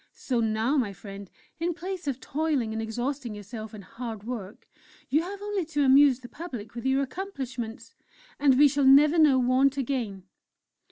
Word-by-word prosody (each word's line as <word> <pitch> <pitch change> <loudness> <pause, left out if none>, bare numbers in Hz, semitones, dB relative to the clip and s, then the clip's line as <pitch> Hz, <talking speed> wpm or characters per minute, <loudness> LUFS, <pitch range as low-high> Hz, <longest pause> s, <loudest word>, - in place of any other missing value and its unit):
So 250 -3 -2
now, 225 +5 +1
my 220 -7 0
friend, 195 +1 -10 0.3
in 340 0 -1
place 360 -1 -6
of 270 -2 -2
toiling 285 -7 -1
and 220 - -2
exhausting 240 +2 -3
yourself 215 +1 -8
in 210 -2 -10
hard 225 0 -7
work, 220 -4 -7 0.4
you 300 +4 +3
have 400 +4 -7
only 410 -2 -1
to 295 -3 0
amuse 270 -1 +6
the 245 - -9
public 250 -9 -8
with 235 +2 -4
your 270 +1 +2
accomplishments 260 - -6 0.5
and 275 -3 +4
we 290 +1 +8
shall 285 0 0
never 295 +5 +6
know 295 -4 +6
want 260 +2 +3
again!" 235 -8 -2
260 Hz, 170 wpm, -27 LUFS, 225-290 Hz, 0.5 s, we